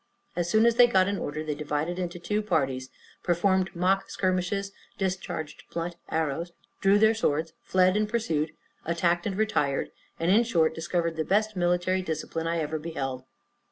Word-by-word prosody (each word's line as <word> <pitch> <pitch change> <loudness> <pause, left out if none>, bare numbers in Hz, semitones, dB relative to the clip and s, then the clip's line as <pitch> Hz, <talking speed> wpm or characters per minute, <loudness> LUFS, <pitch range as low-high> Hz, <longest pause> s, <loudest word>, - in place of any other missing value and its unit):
As 175 0 -1
soon 220 +4 +4
as 235 0 +3
they 245 - +8
got 190 -5 +3
in 200 0 -1
order, 155 +2 -3
they 155 -1 -2
divided 150 +4 -2
into 175 -1 -3
two 210 +5 -1
parties, 135 -10 -1 0.3
performed 190 +1 +1
mock 190 +3 +1
skirmishes, 185 +2 -1 0.3
discharged 185 -5 -3
blunt 170 +1 -3
arrows, 160 +2 -1 0.3
drew 195 +1 +5
their 220 +1 +5
swords, 160 -7 0
fled 185 0 +3
and 210 0 +1
pursued, 165 -10 0 0.3
attacked 170 +2 +1
and 195 -2 -3
retired, 150 -11 0 0.3
and 165 +2 +2
in 220 +4 +6
short 165 -9 +2
discovered 170 0 -1
the 160 - +1
best 210 +4 +1
military 180 +1 +1
discipline 165 -1 -3
I 170 0 0
ever 155 0 -2
beheld. 135 -5 -4
175 Hz, 165 wpm, -27 LUFS, 160-195 Hz, 0.3 s, they